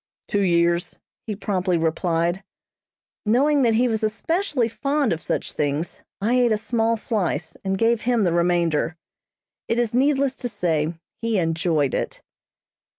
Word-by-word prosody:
"Two 205 - 0
years," 170 -1 +1 0.3
he 210 - -2
promptly 185 -3 0
replied. 170 +2 0 0.8
Knowing 275 +7 +3
that 230 -3 +3
he 245 +3 +3
was 220 -2 0
especially 265 - 0
fond 275 - 0
of 160 - -5
such - - -2
things, 145 +3 -2 0.2
I 215 +5 +1
ate 250 -2 +3
a 215 - +3
small 225 +1 0
slice, 175 -8 -2
and 195 0 -1
gave 230 +1 +2
him 240 -2 +2
the 175 -3 +2
remainder. 170 -2 +1 0.7
It 230 - 0
is 240 -2 +1
needless 270 +1 +2
to 245 - -3
say 165 -5 0 0.3
he 230 -2 0
enjoyed 165 -5 +1
it. - - -2
210 Hz, 150 wpm, -23 LUFS, 170-235 Hz, 0.8 s, Knowing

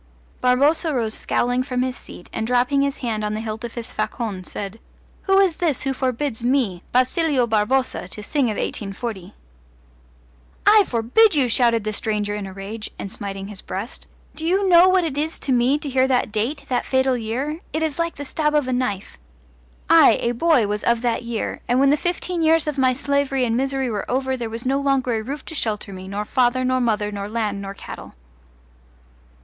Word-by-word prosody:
Barboza 285 +5 +3
rose 225 -3 0
scowling 245 +3 0
from 255 -1 -1
his 255 -1 -2
seat, 175 - -12
and 220 - -2
dropping 250 +3 +2
his 280 0 0
hand 215 -2 -1
on 210 0 -1
the - - -3
hilt 220 0 -5
of 235 - -6
his 235 -2 -5
facon 215 -2 -3
said: 200 +4 -6 0.5
"Who 390 0 +4
is 380 -5 +3
this 320 -7 0
who 270 0 0
forbids 255 -2 -2
me, 240 -9 +1
Basilio 255 +1 +2
Barboza, 225 -1 0
to 210 +3 -8
sing 280 +4 +1
of 215 -3 -1
1840?" 195 -2 -4 1.3
"I 420 -1 +7
forbid 255 - +3
you!" 275 -4 +3
shouted 235 -2 +3
the 215 0 -2
stranger 210 -1 -1
in 205 -1 -4
a - - -8
rage 200 +3 -7
and 195 - -6
smiting 195 0 -6
his 205 -2 -7
breast. 200 +6 -6 0.3
"Do 315 - -7
you 380 +4 +2
know 355 0 +7
what 370 -1 +3
it 295 -4 -2
is 315 +2 -2
to 270 - -2
me 250 +3 +3
to 300 - -5
hear 260 -1 +2
that 250 -3 +1
date 230 +8 -2
that 250 - 0
fatal 260 -1 +1
year? 250 +7 -3
It 315 +1 -1
is 315 -1 -2
like 335 0 -1
the 285 - -7
stab 300 +2 0
of 295 -3 +2
a 255 - 0
knife. 230 -6 -3 0.7
I, - - +7
a 235 - +1
boy, 260 -1 +3
was 210 +1 -2
of 235 0 +1
that 235 -2 0
year; 235 -2 -4
and 245 +1 +2
when 275 0 +5
the - - +5
fifteen 350 +2 -2
years 320 0 +4
of 300 -2 -2
my 260 -1 +4
slavery 280 -1 0
and 230 -1 0
misery 265 0 -1
were 205 -2 -4
over 265 +1 0
there 235 -3 -4
was 230 +2 -6
no 270 +2 +1
longer 275 -3 +1
a 220 - -1
roof 275 +4 -6
to - - -8
shelter 215 -7 -3
me, 185 0 -8
nor 205 +2 -3
father 255 +2 +2
nor 255 0 +1
mother 210 -3 0
nor 200 0 -5
land 210 -3 -2
nor 195 0 -6
cattle!" - - -10
250 Hz, 205 wpm, -22 LUFS, 215-280 Hz, 1.3 s, I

